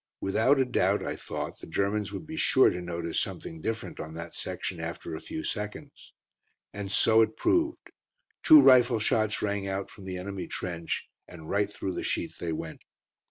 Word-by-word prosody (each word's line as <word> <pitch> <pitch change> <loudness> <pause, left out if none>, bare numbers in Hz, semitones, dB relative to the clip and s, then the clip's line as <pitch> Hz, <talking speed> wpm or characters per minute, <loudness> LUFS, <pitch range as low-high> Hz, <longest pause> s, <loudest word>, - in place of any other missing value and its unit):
Without 110 +8 +3
a 135 - +3
doubt, 125 - +1
I - - -2
thought, - - -5
the - - -10
Germans 100 +4 -1
would - - -6
be 160 +1 -7
sure 130 -4 +5
to 90 - -4
notice 85 -1 -2
something 80 -1 -5
different 110 +4 -4
on 80 +1 -6
that 85 0 -7
section - - -5
after 85 - -5
a 80 - -5
few 160 - -6
seconds. 105 +7 -6 0.6
And 100 -1 -5
so 110 +2 +5
it 110 - +1
proved. 345 -2 +1 0.5
Two 310 -1 +9
rifle 125 - +6
shots 110 -1 +1
rang 100 -1 -1
out 95 0 -3
from 100 - -13
the 95 -1 -4
enemy 95 +1 -5
trench, 85 -2 -4 0.2
and 80 -2 -10
right 100 0 +1
through 95 -2 -4
the - - -3
sheet - - -2
they 85 - -3
went. 80 0 -5
100 Hz, 185 wpm, -28 LUFS, 90-120 Hz, 0.6 s, Two